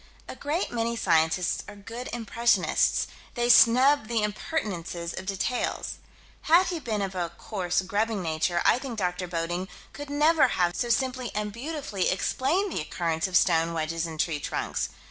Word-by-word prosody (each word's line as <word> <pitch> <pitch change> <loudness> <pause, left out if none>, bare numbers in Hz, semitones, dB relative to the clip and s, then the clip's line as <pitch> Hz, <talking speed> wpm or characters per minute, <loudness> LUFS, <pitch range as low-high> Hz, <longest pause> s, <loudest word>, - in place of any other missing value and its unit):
A - - -7
great 305 +6 -2
many 235 0 -1
scientists 165 -3 +1
are 210 - -9
good 230 +5 -7
impressionists: 235 -3 +2 0.3
they 240 -1 0
snub 255 +2 +6
the 230 -2 0
impertinences 185 - -3
of 190 - -7
details. 200 +5 -2 0.5
Had 345 +3 +7
he 350 -2 -2
been 220 -7 -2
of 195 -1 -3
a 175 -2 -2
coarse, 190 -3 -1
grubbing 205 +1 -1
nature, 170 +2 0
I - - +5
think 255 -4 -6
Dr. 180 -2 -2
Bodding 175 +2 -2 0.3
could 290 0 -8
never 295 +1 +4
have 175 -1 +2
so 240 - -1
simply 255 0 0
and 210 -1 -2
beautifully 265 - -2
explained 320 - 0
the - - -1
occurrence 165 +1 -1
of 180 -1 +3
stone 165 -2 +2
wedges 165 +1 -2
in 160 -1 -7
tree 155 -1 0
trunks. - - -2
210 Hz, 165 wpm, -27 LUFS, 175-250 Hz, 0.5 s, Had